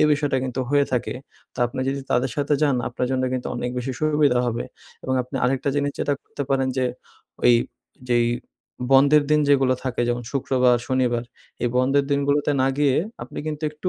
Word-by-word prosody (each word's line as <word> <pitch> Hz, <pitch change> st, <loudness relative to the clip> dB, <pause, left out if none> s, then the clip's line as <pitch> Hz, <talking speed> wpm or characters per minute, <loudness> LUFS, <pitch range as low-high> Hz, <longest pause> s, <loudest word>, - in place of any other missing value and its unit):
এই -, -, +6 dB
বিষয়টা 145 Hz, -2 st, +1 dB
কিন্তু 130 Hz, 0 st, -3 dB
হয়ে 145 Hz, 0 st, +4 dB
থাকে। 125 Hz, -1 st, -1 dB, 0.4 s
তো -, -, -16 dB
আপনি 125 Hz, +2 st, -5 dB
যদি 140 Hz, +1 st, -1 dB
তাদের 125 Hz, +1 st, +1 dB
সাথে 145 Hz, +1 st, +1 dB
যান 140 Hz, -3 st, +3 dB
আপনার 125 Hz, +1 st, -2 dB
জন্য 130 Hz, -1 st, 0 dB
কিন্তু 130 Hz, -1 st, -2 dB
অনেক 125 Hz, -, -2 dB
বেশি 130 Hz, +2 st, -3 dB
সুবিধা 150 Hz, -4 st, +3 dB
হবে। 120 Hz, -1 st, -2 dB, 0.4 s
এবং 130 Hz, -, 0 dB
আপনি 125 Hz, +3 st, -14 dB
আরেকটা 130 Hz, +2 st, 0 dB
জিনিস 145 Hz, 0 st, 0 dB
যেটা 145 Hz, -, 0 dB
করতে -, -, -6 dB
পারেন 135 Hz, -1 st, +2 dB
যে 130 Hz, -, +1 dB, 0.6 s
ওই 120 Hz, -, +7 dB, 0.6 s
যেই 120 Hz, -1 st, +3 dB, 0.7 s
বন্ধের 140 Hz, +3 st, +6 dB
দিন 150 Hz, 0 st, +4 dB
যেগুলো 135 Hz, -2 st, +4 dB
থাকে 130 Hz, -2 st, -2 dB
যেমন 120 Hz, 0 st, -1 dB
শুক্রবার, 125 Hz, -2 st, +2 dB
শনিবার 125 Hz, -3 st, +1 dB, 0.4 s
এই 120 Hz, -, +2 dB
বন্ধের 135 Hz, +3 st, +3 dB
দিনগুলোতে 140 Hz, +1 st, +1 dB
না 130 Hz, -, +3 dB
গিয়ে 140 Hz, -2 st, +3 dB, 0.3 s
আপনি -, -, -8 dB
কিন্তু 155 Hz, 0 st, -4 dB
একটু 150 Hz, +4 st, -4 dB
135 Hz, 185 wpm, -23 LUFS, 125-145 Hz, 0.7 s, ওই